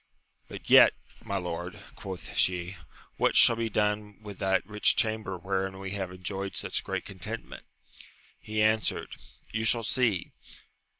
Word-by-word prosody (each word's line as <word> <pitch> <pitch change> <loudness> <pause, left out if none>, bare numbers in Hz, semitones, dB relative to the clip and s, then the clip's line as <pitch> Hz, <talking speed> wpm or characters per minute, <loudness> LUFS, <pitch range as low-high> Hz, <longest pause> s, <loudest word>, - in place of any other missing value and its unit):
But - - -10
yet, - - +8 0.3
my 100 - -2
lord, 90 0 -5 0.2
quoth 95 -2 -8
she, 90 0 +1 0.4
what - - +2
shall 115 - +7
be 115 0 -2
done 105 -1 -1
with 100 -2 -9
that 95 0 +1
rich 105 0 +3
chamber 110 -4 -1
wherein 95 +1 -2
we 95 0 -6
have 95 -2 -3
enjoyed 95 +2 -5
such - - -2
great - - -3
contentment? - - -7 0.7
He 110 0 -1
answered. 110 0 0 0.4
You 110 0 -2
shall 115 +1 +2
see. 110 -6 +1
100 Hz, 140 wpm, -28 LUFS, 95-110 Hz, 0.7 s, yet